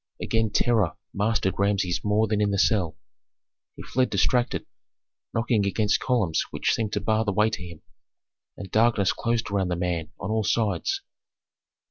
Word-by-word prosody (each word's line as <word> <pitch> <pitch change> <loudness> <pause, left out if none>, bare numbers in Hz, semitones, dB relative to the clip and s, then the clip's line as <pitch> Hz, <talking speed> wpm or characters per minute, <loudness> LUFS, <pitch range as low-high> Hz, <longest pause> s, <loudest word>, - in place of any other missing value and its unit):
Again 115 -1 0
terror 105 -4 +2 0.2
mastered 100 -2 0
Rameses 100 -3 +1
more 105 +1 +2
than 105 -1 0
in 105 - +2
the 100 - 0
cell. 95 -6 +2 0.8
He - - -9
fled 130 0 0
distracted, 125 -1 +1 0.7
knocking 115 -2 +1
against 105 +1 +1
columns 110 -11 +1
which - - 0
seemed 110 -2 -2
to - - +1
bar 110 +1 +1
the 105 - -1
way 105 +2 +2
to 110 - -4
him, 85 -3 -11 0.7
and 95 -2 -8
darkness 110 -3 +3
closed 115 -2 -1
around 100 -2 +1
the 90 - -1
man 85 -2 -2
on 100 - -4
all 110 0 +1
sides. 115 - 0
105 Hz, 160 wpm, -25 LUFS, 95-115 Hz, 0.8 s, darkness